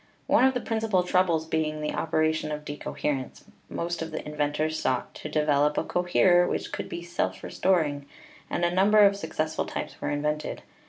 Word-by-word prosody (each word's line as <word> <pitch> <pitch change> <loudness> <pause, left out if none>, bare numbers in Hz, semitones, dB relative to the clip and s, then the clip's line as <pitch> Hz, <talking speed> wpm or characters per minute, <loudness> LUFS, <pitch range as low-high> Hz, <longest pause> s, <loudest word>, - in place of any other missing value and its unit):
One - - +4
of 265 0 +3
the 250 - -1
principal 220 -5 0
troubles 180 -3 +2
being 155 -1 -1
the 150 0 -2
opera 155 -1 +1
tion 155 -1 -3
of 150 0 -5
decoherence, 145 -2 -4 0.3
most 170 0 -3
of 165 - -3
the 155 -1 -6
inventors 150 +1 -1
sought 130 -1 -1
to 155 - -7
de 150 0 +1
velop 150 0 +2
a - - +2
coherer 175 0 +3
which - - -3
should - - -5
be 170 - -5
self 170 0 -3
restoring, 150 -7 0 0.4
and 175 - 0
a 175 - 0
number 205 +3 +5
of 200 0 +4
successful 155 -4 -2
types - - -6
were - - -1
invented. 150 +1 -2
160 Hz, 190 wpm, -27 LUFS, 150-175 Hz, 0.4 s, number